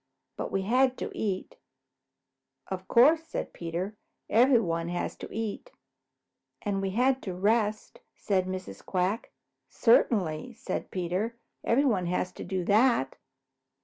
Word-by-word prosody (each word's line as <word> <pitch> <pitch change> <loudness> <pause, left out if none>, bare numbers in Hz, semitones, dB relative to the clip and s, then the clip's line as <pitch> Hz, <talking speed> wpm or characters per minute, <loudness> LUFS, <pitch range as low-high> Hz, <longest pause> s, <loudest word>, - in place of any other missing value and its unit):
But - - -4
we 195 0 0
had 255 +5 +3
to - - -4
eat." 195 -3 -3 1.1
"Of 185 -1 -6
course," 300 +7 +6
said 325 - -5
Peter. 170 +4 -4 0.4
"Everybody 215 -9 +3
has 175 - -2
to - - -7
eat." 225 - -4 0.9
"And 200 -2 -1
we 195 - -1
had 255 +6 +2
to 185 -3 -5
rest," 215 +2 0 0.2
said 185 -3 0
Mrs. 185 - -6
Quack. 185 +4 -1 0.4
"Certainly," 215 -3 +2
said 210 -4 -4
Peter. 185 +6 -2 0.3
"Everybody 230 -8 +2
has 180 +1 -1
to - - -8
do 185 -2 -2
that." 210 - +3
200 Hz, 125 wpm, -28 LUFS, 185-235 Hz, 1.1 s, course